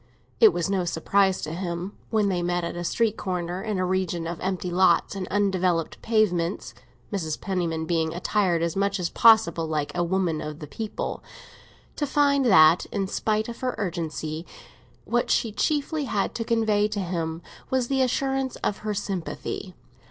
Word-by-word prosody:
It 440 -2 +8
was 170 - -1
no 195 -2 0
surprise 190 +3 +1
to 155 - -4
him, 175 +2 -4
when 215 -2 +2
they 180 -3 0
met 175 0 0
at 170 - -4
a 175 - -4
street 220 +5 0
corner, 180 -1 -3
in 215 -1 -2
a 185 - 0
region 180 -2 -1
of 170 0 -4
empty 185 -1 -2
lots 185 +1 +3
and 190 -2 -4
undeveloped 185 -4 0
pavements 195 -6 0 0.4
(Mrs. 160 -6 -2
Penniman 170 -4 -2
being 160 -1 0
attired 175 -1 +1
as 170 -1 -1
much 200 0 0
as 175 -2 -2
possible 220 -8 +5
like 150 -2 -2
a 175 - +1
"woman 170 -3 0
of 150 -1 -6
the 155 - -8
people"), 210 +9 -5 0.7
to 290 - -1
find 280 -1 +3
that, 165 -6 +6
in 200 -2 -2
spite 215 +2 -1
of 235 -1 -7
her 255 -1 -2
urgency, 165 -5 -3 0.6
what 240 0 0
she 225 - +2
chiefly 295 +5 0
had 205 -6 -1
to 230 - -3
convey 220 -3 +2
to 210 -1 -4
him 170 -3 -3 0.3
was 260 -2 +1
the 270 0 +1
assurance 265 +1 0
of 205 - -1
her 215 -1 -3
sympathy. 190 -1 -4
190 Hz, 175 wpm, -25 LUFS, 170-215 Hz, 0.7 s, It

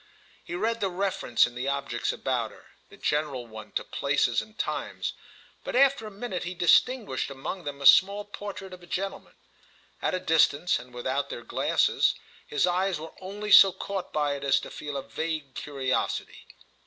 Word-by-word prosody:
He 175 - -6
read 225 +5 0
the 195 - 0
reference 185 - +2
in 120 - -7
the 125 +2 -4
objects 140 -4 -1
about - - -1
her—the - - -19
general 150 -4 -1
one 110 -1 -10
to - - -1
places 140 0 +1
and 215 0 -14
times; - - -3 0.5
but - - -4
after 270 -4 +4
a - - -6
minute 205 -2 -5
he 180 +1 -5
distinguished 180 - +3
among 140 +6 -6
them 145 -1 -5
a - - -3
small 200 +6 +6
portrait 200 -2 -7
of 180 - -11
a 175 - -14
gentleman. 195 +3 -4 0.7
At - - 0
a - - -1
distance 160 -2 +3
and 125 +1 -13
without 130 +3 -2
their 120 - -6
glasses - - +2 0.3
his 145 - +2
eyes 180 -1 +1
were 160 +1 -8
only 205 +3 -5
so 195 -1 +10
caught 195 0 -5
by 150 -2 +1
it 140 0 -6
as 140 0 +3
to - - -9
feel 145 -2 -5
a 135 - -4
vague 155 -1 -4
curiosity. 135 -3 -2
165 Hz, 180 wpm, -27 LUFS, 140-195 Hz, 0.7 s, so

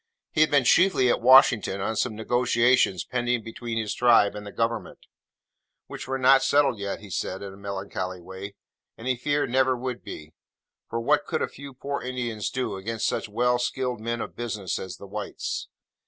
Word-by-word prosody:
He 155 - +1
had 155 - +5
been 140 -2 +4
chiefly 135 -2 +4
at - - 0
Washington 120 -5 +6
on 110 +3 -2
some 110 0 -1
negotiations 120 -3 +2
pending 120 -2 -1
between 115 +1 -5
his 110 -2 -1
Tribe 115 -4 +4
and 105 0 -8
the - - -7
Government: 115 +1 -2 0.9
which - - -8
were 135 0 -1
not 135 +1 +6
settled 140 -6 +3
yet 100 0 -4
(he 105 -2 -12
said 95 +2 -3
in 100 -1 -7
a - - -13
melancholy 95 -2 -5
way), 95 +3 -9 0.4
and 115 - -8
he 130 - +2
feared 145 +1 -1
never 130 0 +3
would 125 0 -5
be: 75 +1 -9 0.6
for 115 - -2
what 145 +5 +1
could 155 - -1
a - - 0
few 140 -1 -11
poor 140 +1 -4
Indians 120 -4 -3
do, 130 -6 -3
against 110 +3 -3
such 110 - -1
well 125 +3 +1
skilled 125 -1 -2
men 115 +1 -2
of - - -6
business 110 -6 -3
as 95 - -7
the - - -11
whites? 100 +1 -5
120 Hz, 190 wpm, -26 LUFS, 105-130 Hz, 0.9 s, Washington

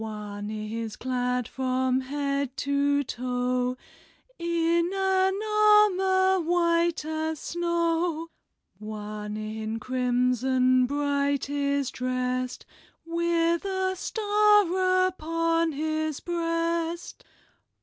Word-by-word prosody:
One 210 -1 -6
is 215 +1 -5
clad 250 -1 -1
from 260 0 0
head 280 0 -2
to 285 0 +2
toe 250 0 -1 0.6
In 340 0 +1
an 385 0 +1
ar 425 0 +6
mor 375 0 +2
white 340 -1 +1
as 315 0 -2
snow. 335 -1 -1 0.5
One 210 0 -6
in 215 +1 -4
crim 250 +1 +1
son 255 0 +2
bright 285 0 0
is 280 -2 0
drest, 255 0 -2 0.4
With 335 0 +1
a 380 -1 -1
star 410 -3 +3
up 370 -2 -4
on 330 +1 +1
his 310 0 -2
breast. 335 0 -2
295 Hz, 95 wpm, -26 LUFS, 250-340 Hz, 0.6 s, ar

